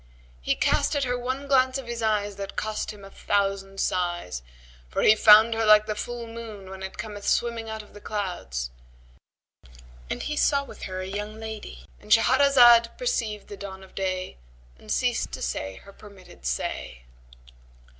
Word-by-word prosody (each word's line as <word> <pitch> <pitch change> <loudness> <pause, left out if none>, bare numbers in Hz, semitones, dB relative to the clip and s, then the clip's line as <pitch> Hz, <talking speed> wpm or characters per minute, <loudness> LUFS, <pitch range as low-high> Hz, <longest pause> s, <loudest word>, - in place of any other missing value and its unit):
He - - +1
cast - - +1
at 285 - +1
her 245 -1 0
one 260 +3 -3
glance 260 -1 +3
of 265 -3 -7
eyes 210 -2 0
that 200 0 -6
cost 215 0 -3
him 205 -2 -9
a 195 - -12
thousand 195 -1 -1
sighs, 175 - -1 0.5
for - - -1
he 215 - +8
found 215 +1 +7
her 225 0 0
like 215 -1 +6
the 215 - -2
full 240 +2 -5
moon 225 -4 -9
when 190 0 -9
it 190 0 -7
cometh 205 -2 -6
swimming 230 -1 0
out 220 -1 -5
of - - -19
the 205 - -12
clouds; 175 - -4 1.4
and - - -3
he 300 - -3
saw 280 -1 +2
with - - -9
her 185 -1 -5
a - - -4
young 210 +3 -5
lady,—And 220 -1 -9
Shahrazad 240 0 +6
perceived 230 - -2
the 205 - -8
dawn 190 -1 -8
of 190 - -16
day 185 - -3 0.4
and - - -9
ceased - - 0
to - - -5
say 95 0 -3
her 200 - -14
permitted 190 - -12
say. - - -3
210 Hz, 170 wpm, -26 LUFS, 190-230 Hz, 1.4 s, he